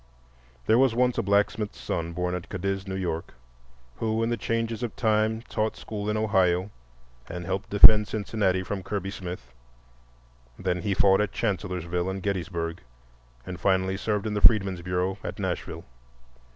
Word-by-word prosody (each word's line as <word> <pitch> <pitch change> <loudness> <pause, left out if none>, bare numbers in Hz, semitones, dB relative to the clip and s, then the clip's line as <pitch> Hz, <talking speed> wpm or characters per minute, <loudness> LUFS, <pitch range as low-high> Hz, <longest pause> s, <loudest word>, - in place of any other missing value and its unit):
There 115 - +4
was 130 -3 +3
once 125 0 +2
a - - +3
blacksmith's 100 +1 0
son 85 0 -3
born 90 +1 -2
at 90 -1 -5
Cadiz, 95 0 -3
New 95 - -3
York, 85 -7 -4 0.6
who 110 0 0
in 115 - 0
the - - +2
changes 115 +1 -2
of 120 -3 -4
time 110 0 +1
taught 110 -3 -2
school 105 -1 -5
in 105 - 0
Ohio 95 -3 +2 0.6
and 90 0 -6
helped 95 +2 -3
defend 105 0 +8
Cincinnati 100 -3 0
from 100 +1 -4
Kirby 100 0 -4
Smith. 85 -11 -8 1.0
Then 90 -1 -1
he 100 +2 -1
fought 95 +1 +4
at 105 - -1
Chancellorsville 90 -4 -2
and 95 -1 -5
Gettysburg 85 -3 -3 0.6
and 90 -1 -7
finally 95 0 +1
served 105 +1 -2
in 110 - -2
the 105 - -1
Freedmen's 95 -5 +5
Bureau 90 +2 -1
at - - -5
Nashville. - - -4
95 Hz, 160 wpm, -26 LUFS, 90-110 Hz, 1.0 s, defend